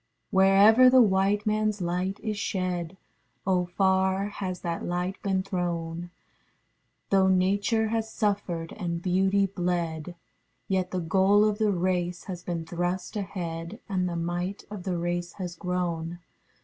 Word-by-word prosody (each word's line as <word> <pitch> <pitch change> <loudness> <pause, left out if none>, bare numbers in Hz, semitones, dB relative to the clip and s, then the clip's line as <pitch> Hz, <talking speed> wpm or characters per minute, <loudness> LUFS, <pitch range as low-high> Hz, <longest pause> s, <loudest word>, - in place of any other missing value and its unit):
Wherever 200 +6 +7
the 260 0 +6
white 200 0 +2
manâs 215 -1 +1
light 180 +2 -2
is 215 -1 -2
shed, 185 -3 -2 0.5
(Oh 180 -2 +2
far 190 +2 +1
has 185 -3 -5
that 170 -1 -3
light 180 +2 -2
been 190 -1 0
thrown) 175 -2 -3 1.0
Though 190 -1 +5
Nature 200 +4 +2
has 225 0 -2
suffered 195 -6 -1
and 170 -4 -2
beauty 190 +2 +2
bled, 175 -3 -2 0.5
Yet 185 -1 0
the 185 -1 -2
goal 195 +5 +4
of 210 0 0
the 215 -1 +3
race 180 -1 -1
has 180 -3 -6
been 170 -2 -4
thrust 175 +5 -3
ahead, 175 -1 -5
And 185 -3 0
the 170 - -4
might 175 +3 -3
of 200 -4 -7
the 180 -2 -1
race 175 0 -2
has 180 -3 -6
grown. 175 -2 -2
185 Hz, 140 wpm, -27 LUFS, 175-200 Hz, 1.0 s, Wherever